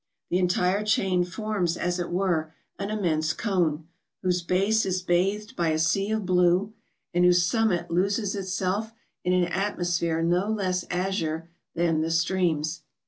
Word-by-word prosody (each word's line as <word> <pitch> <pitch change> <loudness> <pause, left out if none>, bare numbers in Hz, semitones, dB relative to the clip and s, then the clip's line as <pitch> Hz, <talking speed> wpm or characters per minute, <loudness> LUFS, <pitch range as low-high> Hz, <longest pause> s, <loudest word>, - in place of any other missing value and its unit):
The 180 - +2
entire 180 +2 +1
chain 190 -4 +2
forms, 180 -2 -2
as 175 +1 -1
it 175 - -3
were, 175 -4 0 0.3
an 200 0 -3
immense 160 -7 0
cone, 170 -7 -1 0.4
whose 180 -1 +1
base 195 +6 +2
is 185 -1 -1
bathed 195 +4 0
by 170 -2 +1
a 155 - +1
sea 195 +6 +1
of 220 -2 -1
blue, 180 +3 +2 0.4
and 175 +1 +3
whose 180 0 +5
summit 180 -4 +1
loses 200 +4 +1
itself 190 +3 -2 0.3
in 180 0 +1
an 180 -1 +3
atmosphere 175 -3 -1
no 175 +4 +1
less 185 -4 -1
azure 170 -3 -2 0.2
than 165 -2 +1
the 160 - -1
streams. 165 -2 0
180 Hz, 150 wpm, -26 LUFS, 170-195 Hz, 0.4 s, whose